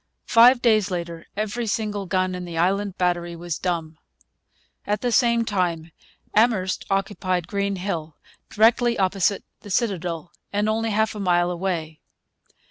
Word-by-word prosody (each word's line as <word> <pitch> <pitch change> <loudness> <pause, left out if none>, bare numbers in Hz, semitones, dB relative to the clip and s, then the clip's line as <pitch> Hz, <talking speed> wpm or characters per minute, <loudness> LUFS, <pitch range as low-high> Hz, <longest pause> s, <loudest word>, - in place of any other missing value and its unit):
Five 240 +2 +6
days 215 -4 +3
later 170 -2 -5
every 215 +3 -2
single 205 -2 -2
gun 185 0 0
in 180 0 -5
the 170 -2 -6
Island 195 +3 0
Battery 175 -1 0
was 170 -1 -5
dumb. 165 -4 -3 0.9
At 205 0 0
the 245 - 0
same 235 -1 +3
time 175 -6 -1 0.4
Amherst 210 -4 +2
occupied 190 -3 -1
Green 200 0 -1
Hill, 170 -5 -4 0.3
directly 235 +2 +3
opposite 195 +1 +1 0.2
the 205 - -12
citadel 180 -6 -2 0.2
and 205 +1 0
only 225 +1 0
half 220 +1 +1
a 210 - -7
mile 175 -2 +2
away. 170 -3 -3
195 Hz, 140 wpm, -23 LUFS, 175-215 Hz, 0.9 s, Five